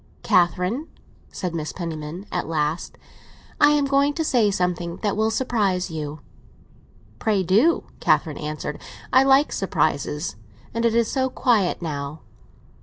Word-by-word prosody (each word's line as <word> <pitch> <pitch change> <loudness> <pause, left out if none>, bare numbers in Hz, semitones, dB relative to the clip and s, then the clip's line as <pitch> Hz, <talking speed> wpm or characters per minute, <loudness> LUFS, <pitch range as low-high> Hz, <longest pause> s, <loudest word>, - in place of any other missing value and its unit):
"Catherine," 180 - +2 0.4
said 180 -3 -4
Mrs. 155 -2 -4
Penniman 165 +1 -5
at - - -2
last, 155 0 -2 0.6
"I 290 - +7
am 290 -1 +2
going 280 +1 +2
to 325 - 0
say 240 -8 +3
something 180 -2 -1
that 205 -2 +1
will 220 +1 +2
surprise 205 -7 0
you." 150 -1 -5 1.0
"Pray 210 -4 +1
do," 215 - +3 0.2
Catherine 155 -4 +1
answered; 150 0 -5 0.3
"I 260 - +7
like 270 +2 +4
surprises. 150 - -1 0.4
And 230 +1 0
it 230 -1 +2
is 235 -1 +2
so 260 -1 +1
quiet 215 -9 +1
now." 145 -1 -4
185 Hz, 135 wpm, -23 LUFS, 160-240 Hz, 1.0 s, I